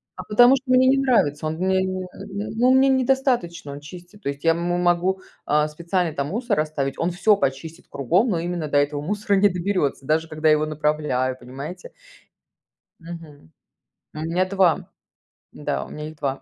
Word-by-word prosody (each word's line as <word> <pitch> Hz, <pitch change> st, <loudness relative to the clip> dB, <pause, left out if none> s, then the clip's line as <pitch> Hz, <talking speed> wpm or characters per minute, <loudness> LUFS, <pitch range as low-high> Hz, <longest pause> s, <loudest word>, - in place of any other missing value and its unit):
А -, -, -7 dB
потому 245 Hz, +5 st, +6 dB
что 255 Hz, -1 st, -4 dB
мне 255 Hz, 0 st, +5 dB
не 265 Hz, +1 st, +4 dB
нравится, 225 Hz, -, +2 dB
он 155 Hz, -, -2 dB
мне 190 Hz, +2 st, +1 dB
не 185 Hz, 0 st, -3 dB, 0.2 s
не 200 Hz, +2 st, -5 dB
ну, 245 Hz, +3 st, +4 dB
мне 265 Hz, +1 st, +5 dB
недостаточно 255 Hz, -, 0 dB
он 140 Hz, -, -7 dB
чистит, 175 Hz, +7 st, -13 dB
то -, -, -1 dB
есть 140 Hz, 0 st, -6 dB
я, 165 Hz, -, +5 dB
м, 165 Hz, -, -1 dB, 0.2 s
могу, 180 Hz, +2 st, +1 dB, 0.2 s
а, 150 Hz, 0 st, +2 dB
специально 170 Hz, +2 st, -2 dB
там 140 Hz, -2 st, -2 dB
мусор 225 Hz, +1 st, -1 dB
оставить, 150 Hz, -3 st, -2 dB
он 170 Hz, +2 st, 0 dB
всё 200 Hz, +4 st, +3 dB
почистит 145 Hz, +1 st, -3 dB
кругом, 175 Hz, -, +1 dB
но 170 Hz, -, 0 dB
именно 170 Hz, -2 st, -3 dB
до 145 Hz, -, +1 dB
этого 145 Hz, 0 st, +1 dB
мусора 205 Hz, +5 st, 0 dB
не 200 Hz, +1 st, +5 dB
доберётся, 180 Hz, -7 st, -1 dB
даже 160 Hz, +3 st, +1 dB
когда 155 Hz, 0 st, 0 dB
его 155 Hz, 0 st, +3 dB
направляю, 150 Hz, -4 st, -1 dB
понимаете. 140 Hz, +9 st, -8 dB, 1.1 s
Мгм. 165 Hz, -, -11 dB, 0.6 s
У -, -, -7 dB
меня 165 Hz, +4 st, 0 dB
2, 185 Hz, -4 st, +2 dB, 0.6 s
да, -, -, -3 dB
у -, -, -13 dB
меня 150 Hz, 0 st, -7 dB
их 155 Hz, -, -14 dB
2. 140 Hz, -2 st, -3 dB
170 Hz, 185 wpm, -23 LUFS, 150-200 Hz, 1.1 s, потому